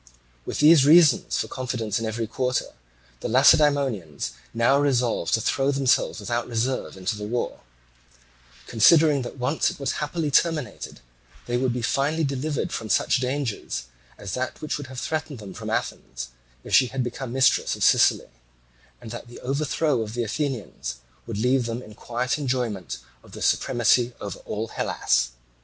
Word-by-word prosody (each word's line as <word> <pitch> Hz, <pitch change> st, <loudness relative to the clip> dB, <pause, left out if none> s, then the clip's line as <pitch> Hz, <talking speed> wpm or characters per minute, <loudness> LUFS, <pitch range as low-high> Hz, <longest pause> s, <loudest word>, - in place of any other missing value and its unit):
With -, -, -3 dB
these 155 Hz, -1 st, +7 dB
reasons 155 Hz, +2 st, +5 dB
for -, -, -1 dB
confidence 125 Hz, -5 st, -3 dB
in 115 Hz, -, -3 dB
every 115 Hz, +1 st, -2 dB
quarter, 125 Hz, +3 st, -2 dB, 0.5 s
the -, -, -4 dB
Lacedaemonians 120 Hz, -, +3 dB, 0.2 s
now 120 Hz, +4 st, +3 dB
resolved 125 Hz, -5 st, +1 dB
to 115 Hz, -, -2 dB
throw 135 Hz, +5 st, +1 dB
themselves 135 Hz, -3 st, +1 dB
without 120 Hz, +3 st, -2 dB
reserve 120 Hz, -2 st, -2 dB
into 95 Hz, +3 st, -2 dB
the 105 Hz, 0 st, -6 dB
war, 120 Hz, +2 st, -2 dB, 1.1 s
considering 145 Hz, +5 st, +5 dB
that, 125 Hz, +2 st, -7 dB
once 130 Hz, +5 st, +1 dB
it -, -, -8 dB
was 140 Hz, -, -2 dB
happily 150 Hz, 0 st, -2 dB
terminated, 155 Hz, -2 st, 0 dB, 0.4 s
they 120 Hz, -, -2 dB
would 125 Hz, 0 st, +1 dB
be 120 Hz, -1 st, -3 dB
finally 145 Hz, +7 st, +1 dB
delivered 140 Hz, 0 st, -2 dB
from 110 Hz, -, -4 dB
such 105 Hz, -, +2 dB
dangers 125 Hz, -, -3 dB, 0.3 s
as 100 Hz, -2 st, -6 dB
that 130 Hz, 0 st, -3 dB
which 155 Hz, -1 st, -3 dB
would 145 Hz, -, -7 dB
have 130 Hz, -1 st, -7 dB
threatened 155 Hz, -2 st, -3 dB
them 105 Hz, -3 st, -9 dB
from -, -, -7 dB
Athens, -, -, -4 dB, 0.3 s
if -, -, -7 dB
she 130 Hz, -, +6 dB
had 130 Hz, +1 st, -2 dB
become 120 Hz, +1 st, -5 dB
mistress 130 Hz, +1 st, +3 dB
of -, -, -3 dB
Sicily, -, -, +4 dB, 0.7 s
and 110 Hz, -, -10 dB
that 120 Hz, +1 st, -7 dB
the 120 Hz, -, -11 dB
overthrow 140 Hz, 0 st, 0 dB
of 110 Hz, +1 st, -5 dB
the 120 Hz, -, 0 dB
Athenians 115 Hz, -, -3 dB, 0.3 s
would 115 Hz, -3 st, -4 dB
leave 125 Hz, +2 st, +2 dB
them 115 Hz, +2 st, -4 dB
in 105 Hz, -, -12 dB
quiet 120 Hz, +5 st, -2 dB
enjoyment 125 Hz, -, -2 dB, 0.2 s
of -, -, -18 dB
the -, -, -8 dB
supremacy 120 Hz, +1 st, +2 dB
over 100 Hz, -, -6 dB
all 110 Hz, +2 st, -4 dB
Hellas. -, -, 0 dB
125 Hz, 165 wpm, -24 LUFS, 115-140 Hz, 1.1 s, these